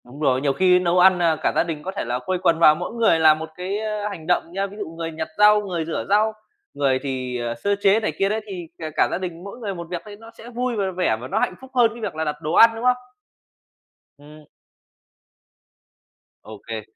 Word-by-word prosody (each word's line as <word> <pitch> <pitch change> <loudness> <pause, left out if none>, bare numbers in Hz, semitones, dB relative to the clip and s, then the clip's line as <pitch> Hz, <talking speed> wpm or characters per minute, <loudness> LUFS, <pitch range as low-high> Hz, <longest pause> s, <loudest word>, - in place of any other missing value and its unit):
Đúng 125 +4 -13
rồi, 135 -4 +2
nhiều 140 -1 +1
khi 180 +4 +4
nấu 180 0 +1
ăn, 185 0 +6
à, 165 -2 +3
cả - - -1
gia - - +3
đình 160 -3 -5
có 190 - -4
thể 195 - -4
là 120 +1 -2
quây 185 +8 -2
quần 165 -2 +2
vào 155 -2 +7
mỗi 180 +7 -5
người 225 -8 +3
làm 155 -1 +5
một 160 0 -6
cái, 185 +3 -3
ơ, 210 -1 -3
hành 165 -6 -9
động 175 -1 0
nhớ. 195 +2 -2
Ví 200 +1 -12
dụ 205 - -5
người 165 0 -6
nhặt 160 0 -5
rau, 210 0 +6
người 175 -5 -3
rửa 165 - -3
rau, 215 +2 +3 0.4
người 135 -2 +1
thì, 130 -2 -3
ờ, 120 0 -3
sơ 200 +12 0
chế 200 +2 +4
này 215 - -1
kia 195 - +2
đấy, 220 +1 -1
thì 180 -4 -7
cả 160 -1 -5
cả - - +3
gia - - -1
đình 175 -2 -6
mỗi 200 +4 -9
người 210 -4 -4
một 170 -1 -7
việc 175 -1 -4
thấy 210 -1 -10
nó 225 +2 -14
sẽ 235 - -11
vui 245 0 -2
v - - -3 0.2
vẻ 110 -12 +1
và 125 - -6
nó - - -1
hạnh 185 - -1
phúc 265 0 -13
hơn 235 -2 +4
cái 235 - -11
việc 215 - -4
là 160 - -2
đặt 150 -1 -2
đồ 155 - -3
ăn, 230 - +8
đúng 225 - -7
không? 250 0 +3 1.2
Ừm. 150 +1 -15 2.0
Ô 110 -1 -11
kê. 110 +1 -6
180 Hz, 255 wpm, -22 LUFS, 155-205 Hz, 2.0 s, ăn